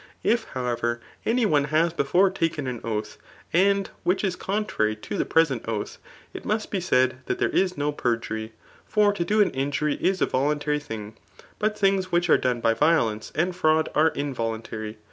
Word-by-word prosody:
If, 230 -1 +2
however, 120 -2 -1 0.3
any 235 +1 +2
one 145 -8 +3
has 160 +3 +2
before 180 +6 +3
taken 165 -6 -1
an 125 -3 -4
oath, 105 -1 -4 0.3
and 195 +2 +3
which 185 +4 0
is 190 -3 0
contrary 190 - -1
[to 110 - -7
the - - 0
present 145 -8 +2
oath,] 110 -2 -4 0.3
it - - -7
must 215 +1 -2
be 195 - 0
said 130 -6 +2
that - - -1
there - - +1
is 185 -1 +1
no 145 +1 0
perjury. 115 -4 -2 0.4
For 210 -1 +3
to 175 - -1
do 210 +4 +2
an 195 - -1
injury 140 +2 -1
is 190 0 +2
a - - +3
voluntary 150 +2 0
thing; 110 -6 -8 0.4
but 215 0 0
things 195 -2 +1
which 175 -1 +2
are - - +7
done 125 -2 0
by 115 - +3
violence 115 -7 +1
and 175 +4 0
fraud 160 -3 +2
are 155 +2 +4
involuntary. 115 -6 -4
150 Hz, 185 wpm, -25 LUFS, 120-185 Hz, 0.4 s, are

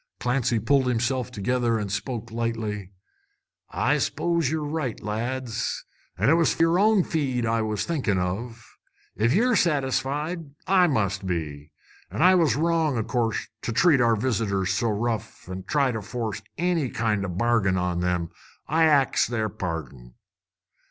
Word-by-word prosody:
Clancy 125 -2 +1
pulled 135 +3 +2
himself 125 +1 0
together 120 +1 0
and 105 -3 -3
spoke 115 +3 -4
lightly. 110 -4 -3 0.8
"I - - +1
s'pose 170 -5 0
ye're 155 0 -1
right, 145 -5 -3
lads, 115 +2 -3 0.3
an' 105 +8 +2
it - - +6
was 165 -1 +2
yer 165 +2 +4
own 210 -2 +4
feed 130 -8 -1
I 115 0 +1
was 105 -2 -2
thinking 135 - 0
of. 110 +6 -3 0.5
If 110 +3 +2
ye're 235 - +3
satisfied, 150 0 -1
I 185 -2 +4
must 100 - -1
be. 75 -4 -4 0.4
An' - - -1
I 185 +1 +7
was 170 -4 +3
wrong, 160 -3 +1
o' 110 - 0
course, 115 -1 -1
to - - -3
treat 145 +2 +4
our 115 -1 +4
visitors 100 -5 0
so 115 +4 0
rough, 110 -1 -3
an' 95 0 -6
try 140 -4 +2
force 110 0 -4 0.2
any 170 -5 0
kind 105 -4 0
o' - - -2
a 90 - -5
bargain 105 -3 +2
on 90 -1 -1
them. 90 -1 -1 0.4
I 160 +1 +3
ax 145 -4 +3
their 110 -2 -1
pardon." 70 -10 -6
120 Hz, 155 wpm, -25 LUFS, 105-145 Hz, 0.8 s, I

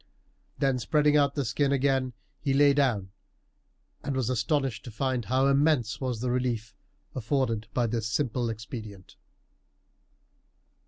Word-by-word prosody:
Then 135 -2 +1
spreading 150 +5 +2
out 140 -1 +3
the 140 -3 -1
skin 140 +6 +1
again 135 -2 +1 0.3
he 135 -2 0
lay 145 0 +6
down, 120 -9 +1 0.9
and 140 -1 -2
was 130 -2 0
astonished 130 +1 0
to - - -7
find 130 0 -1
how 130 +5 +2
immense 140 -5 +2
was 125 -4 -2
the 125 -1 -1
relief 120 -4 -1 0.4
afforded 115 -3 -1
by 120 - +2
this 115 -1 -2
simple 120 -1 -1
expedient. 110 -3 -8
130 Hz, 130 wpm, -28 LUFS, 115-140 Hz, 0.9 s, lay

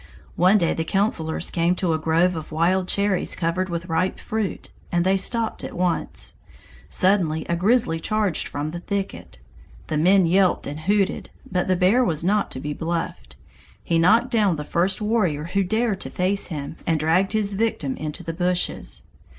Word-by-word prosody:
One 185 +4 +5
day 170 -4 +1
the 160 - -2
councilors 165 -3 -1
came 170 +1 +1
to 175 -2 0
a 160 - 0
grove 165 +3 +2
of 160 -1 -7
wild 180 +4 +1
cherries 200 -2 0
covered 185 +2 -1
with 170 -1 -3
ripe 180 +2 -1
fruit, 215 -3 -4 0.2
and 175 0 +1
they 190 +1 +3
stopped 225 +3 0
at - - -6
once. 180 -1 -2 0.6
Suddenly 185 -5 +2
a 170 - -1
grizzly 190 -2 +2
charged 210 -1 -1
from 145 +2 -4
the 175 - -5
thicket. 195 - -5 0.5
The 155 - 0
men 185 +3 +5
yelped 185 +2 +2
and 145 +2 -5
hooted, 195 +4 0 0.2
but 180 -1 0
the 185 - +3
bear 195 +8 +4
was 160 -9 0
not 205 +3 +1
to - - -5
be 150 +2 -4
bluffed. 165 - -4 0.5
He 165 - +1
knocked 225 +9 +4
down 210 -7 +3
the 150 - -5
first 185 +6 0
warrior 195 -9 +1
who 195 +4 0
dared 220 +1 0
to - - -4
face 190 +2 0
him 150 -2 -6
and 165 -2 +2
dragged 175 +6 +2
his 210 -2 +1
victim 195 -10 -1
into 155 +4 -6
the 165 0 -4
bushes. 180 +1 -2
180 Hz, 180 wpm, -23 LUFS, 165-200 Hz, 0.6 s, One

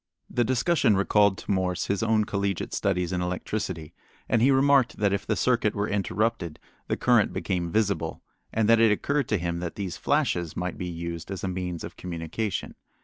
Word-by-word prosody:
The 120 - +2
discussion 130 - +2
recalled 100 0 +3
to - - -5
Morse 95 -2 0
his 100 -1 -1
own 110 -1 +3
collegiate 100 -2 -2
studies 90 -2 0
in 90 - 0
electricity, 90 -2 -3 0.3
and 115 - +2
he 130 - +5
remarked 135 -2 +4
that 100 -2 +2
if 100 0 -2
the 110 - +1
circuit 110 +1 +1
were 100 0 0
interrupted 100 -3 -1 0.3
the - - -1
current - - +3
became 90 -2 -2
visible, 105 -1 0 0.3
and 110 -1 +1
that 115 0 +6
it 115 -2 +5
occurred 140 +7 0
to 105 - +2
him 85 -1 -2
that 85 -1 -4
these 95 -4 -4
flashes 90 - 0
might 90 +1 -3
be 90 - -3
used 85 0 -5
as 95 -2 -5
a - - 0
means 90 -2 -3
of - - -8
communication. 90 +4 -4
100 Hz, 190 wpm, -26 LUFS, 90-110 Hz, 0.3 s, that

